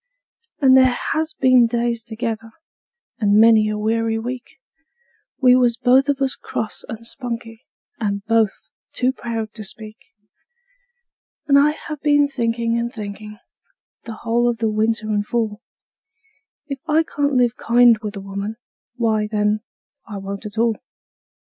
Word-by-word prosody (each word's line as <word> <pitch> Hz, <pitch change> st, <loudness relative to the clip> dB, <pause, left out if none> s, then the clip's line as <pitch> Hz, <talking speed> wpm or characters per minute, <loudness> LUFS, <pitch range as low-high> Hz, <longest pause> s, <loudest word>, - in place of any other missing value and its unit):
And 265 Hz, -2 st, +6 dB
there 260 Hz, -1 st, +5 dB, 0.2 s
has 315 Hz, 0 st, -1 dB
been 255 Hz, -2 st, +5 dB
days 235 Hz, 0 st, -1 dB
together 225 Hz, 0 st, -5 dB, 0.7 s
and 205 Hz, -1 st, +3 dB
many 220 Hz, -1 st, +6 dB
a 215 Hz, -, -2 dB
weary 225 Hz, +1 st, 0 dB
week 245 Hz, +4 st, -6 dB, 0.8 s
We 250 Hz, -2 st, +6 dB
was 245 Hz, -2 st, +3 dB
both 260 Hz, +2 st, +3 dB
of 280 Hz, -1 st, 0 dB
us 270 Hz, -, 0 dB
cross 220 Hz, -, -5 dB
and 225 Hz, +1 st, -7 dB
spunky, 230 Hz, -2 st, -6 dB, 0.3 s
and 200 Hz, -2 st, -2 dB
both 225 Hz, -3 st, +1 dB, 0.3 s
too 255 Hz, +1 st, +1 dB
proud 230 Hz, -3 st, -5 dB
to 215 Hz, -, -7 dB
speak; 215 Hz, +1 st, -5 dB, 1.5 s
And 280 Hz, -1 st, +5 dB
I 290 Hz, +1 st, +5 dB
have 305 Hz, -1 st, -6 dB
been 290 Hz, -1 st, +3 dB
thinkin' 235 Hz, -3 st, -1 dB
and 235 Hz, 0 st, -2 dB
thinkin', 210 Hz, -2 st, -8 dB, 0.7 s
the 225 Hz, -2 st, -7 dB
whole 240 Hz, +1 st, +2 dB
of 235 Hz, -, -2 dB
the 225 Hz, -1 st, 0 dB
winter 220 Hz, +1 st, 0 dB
and 205 Hz, -1 st, +1 dB
fall, 220 Hz, -1 st, -2 dB, 1.0 s
If 275 Hz, -3 st, -6 dB
I 315 Hz, +1 st, +3 dB
can't 285 Hz, -3 st, -1 dB
live 245 Hz, -1 st, +3 dB
kind 235 Hz, -1 st, +4 dB
with 210 Hz, -1 st, -6 dB
a 200 Hz, -, -6 dB
woman, 200 Hz, +2 st, -5 dB, 0.4 s
why, 220 Hz, -3 st, 0 dB
then, 210 Hz, 0 st, +1 dB, 0.5 s
I 210 Hz, -3 st, -6 dB
won't 200 Hz, +2 st, -6 dB
at 210 Hz, +1 st, -12 dB
all. 230 Hz, -1 st, +2 dB
230 Hz, 145 wpm, -20 LUFS, 215-250 Hz, 1.5 s, And